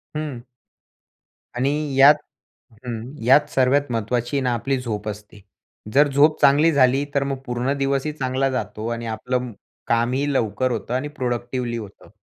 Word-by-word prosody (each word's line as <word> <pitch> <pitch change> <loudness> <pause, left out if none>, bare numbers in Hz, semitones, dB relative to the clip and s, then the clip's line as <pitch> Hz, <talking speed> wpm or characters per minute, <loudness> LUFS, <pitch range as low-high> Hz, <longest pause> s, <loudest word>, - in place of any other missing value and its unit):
हं. 145 -6 -5 1.1
आणि 130 +3 0 0.3
यात 140 +2 +8 0.7
हं, 115 -3 -4 0.2
यात 145 +4 +5
सर्वात 135 +1 +2
महत्त्वाची 120 +3 -2
आहे - - 0
ना 125 -1 +1
आपली 125 +4 -1
झोप 105 -3 -4
असते. 105 0 -10 0.5
जर 145 +2 +5
झोप 150 +3 +4
चांगली 145 +3 +5
झाली, 135 0 +3
तर 140 - +2
मग 135 -1 -3
पूर्ण 125 +3 -1
दिवसही 140 +2 0
चांगला 130 -1 -1
जातो 110 -2 -4
आणि 115 - -7
आपलं 125 +3 -3 0.4
कामही 125 +5 +1
लवकर 120 +1 0
होतं 115 +1 -4
आणि 140 +3 -2
प्रॉडक्टिव्हली 120 -3 -3
होतं. 105 -3 -10
125 Hz, 145 wpm, -22 LUFS, 120-140 Hz, 1.1 s, यात